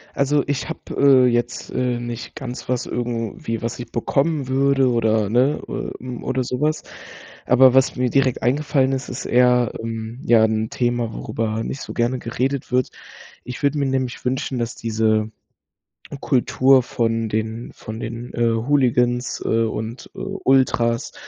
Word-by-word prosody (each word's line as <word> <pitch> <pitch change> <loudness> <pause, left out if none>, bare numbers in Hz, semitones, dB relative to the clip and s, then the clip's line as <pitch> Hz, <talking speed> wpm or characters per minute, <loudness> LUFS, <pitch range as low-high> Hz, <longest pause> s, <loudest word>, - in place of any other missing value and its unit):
Also, 140 +1 +2
ich 145 -1 -2
habe, - - -5 0.2
äh, 135 -2 +6
jetzt, 120 -1 -1
äh, 125 -1 -1
nicht 120 +2 -6
ganz 125 -4 -7
was 125 -1 0
irgendwie, 115 -2 -3
was 115 +1 -3
ich 120 -1 -8
bekommen 140 +4 0
würde 135 0 +3
oder 110 -2 +2
ne, 125 +7 +2
äh, - - -4
hm, 125 -2 -6
oder 130 0 -1
so 125 +2 -4
was. 155 +1 0 0.6
Aber 130 0 +6
was 135 0 +3
mir 125 -1 0
direkt 135 -3 +1
eingefallen 135 +1 +2
ist, 135 0 -3
ist 125 - -6
eher, 125 -1 +3
ähm, 115 +1 -5
ja 115 -2 +5
'n 110 0 -1
Thema, 120 -2 -1
worüber 110 0 -3
nicht 135 - -5
so - - -7
gerne 120 +2 0
geredet 130 +3 -2
wird. 125 0 +2 0.5
Ich 125 +3 -8
würde 145 +1 +2
mir 140 - +1
nämlich 130 -2 -2
wünschen, 130 0 -2
dass 115 -1 -3
diese 110 -1 0 0.9
Kultur 130 0 +3
von 115 -1 -1
den 110 +2 -3
von 110 +1 -8
den, 115 +1 -6
äh, 120 0 +2
Hooligans, 125 0 +1
äh, 115 0 +2
und, 110 +2 -5
äh, - - -10
Ultras, 120 -3 +1
120 Hz, 160 wpm, -21 LUFS, 115-130 Hz, 0.9 s, äh